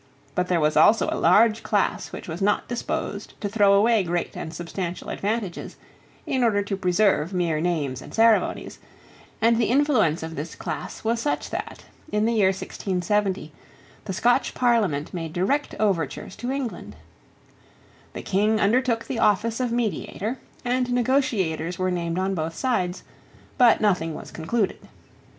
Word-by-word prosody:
But 180 0 0
there 180 -2 +2
was 150 -1 +2
also 210 +9 +5
a - - -1
large 225 +1 +4
class 205 -2 0
which - - -8
was 165 +2 -6
not 205 +1 +1
disposed 215 -3 -4
to 205 - -2
throw 205 -1 +4
away 220 +2 +4
great 175 -1 -2
and 160 - -5
substantial 175 +2 -5
advantages 205 -3 -3 0.5
in 260 -2 0
order 205 -3 +2
to 200 0 -3
preserve 185 -2 +1
mere 170 -4 0
names 150 -7 -1
and - - -11
ceremonies; 225 -1 +2 0.6
and 230 0 +5
the 230 - +2
influence 245 - +2
of 160 0 -6
this 150 +3 -6
class - - -6
was 230 +1 0
such 290 - -2
that, - - -6 0.3
in 210 +1 +1
the 230 - +2
year 210 -4 +4
1670, 190 -1 -1 0.5
the 195 - -3
Scotch 245 +7 +2
Parliament 215 - +1
made 165 -3 -5
direct 230 +12 0
overtures 190 -4 -1
to 240 +4 -4
England, 270 -4 -4 1.2
The - - -6
King 210 +3 +1
undertook 230 +2 +2
the 250 - -3
office 220 +3 +2
of 250 -2 -1
mediator; 230 0 -2 0.3
and 250 0 0
negotiators 220 - 0
were 185 0 0
named 170 -1 -2
on 190 +1 0
both 165 -2 -3
sides; 185 -8 -1 0.5
but 245 -3 +5
nothing 180 -7 +1
was - - -9
concluded. 200 +6 -1
205 Hz, 155 wpm, -24 LUFS, 175-230 Hz, 1.2 s, also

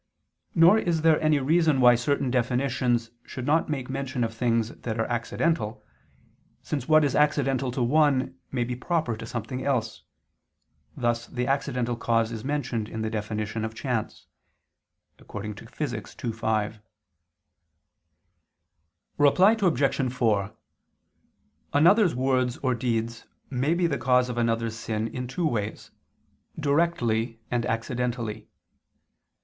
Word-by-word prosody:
Nor 175 +6 +7
is 165 -5 0
there 160 -1 +4
any 155 -1 +3
reason 155 +1 +2
why 125 -1 +7
certain 130 +2 0
definitions 125 -1 0
should 130 - -7
not 155 +3 +2
make 135 -4 -3
mention 130 -2 -3
of 115 -1 -2
things 115 -1 +1
that 115 -1 -5
are 115 - +1
accidental, 120 +1 -1 0.8
since 140 -4 -3
what 155 0 +6
is 140 - 0
accidental 135 -3 +2
to 125 0 -1
one, 135 -1 +2 0.2
may 125 -2 0
be 125 +1 -3
proper 150 -2 -1
to 110 +1 -8
something 120 +2 -4
else: 120 -6 -1 1.0
thus 120 -1 0
the 125 0 -3
accidental 125 -3 -1
cause 115 -1 +1
is 115 -2 -6
mentioned 130 -6 -2
in 110 0 -4
the 110 - -2
definition 105 0 -3
of 110 0 -4
chance 110 -4 -3 0.9
(Phys. 105 +6 -6
ii, 115 - 0
5). 110 -1 -1 2.4
Reply 180 +8 +6
Obj. 135 -7 +1
4: 110 -5 +1 1.2
Another's 175 - +5
words 130 -1 +1
or 130 -1 +2
deed 115 -1 -1 0.4
may 135 +6 +1
be 175 0 +1
the 150 -5 0
cause 125 -1 +3
of 120 -1 -3
another's 115 -1 0
sin 110 -1 -3
in 125 +2 -5
two 170 +7 -2
ways, 110 -8 -3 0.7
directly 125 -7 +1
and 120 -1 0
accidentally. 115 -2 -3
125 Hz, 130 wpm, -26 LUFS, 115-140 Hz, 2.4 s, Nor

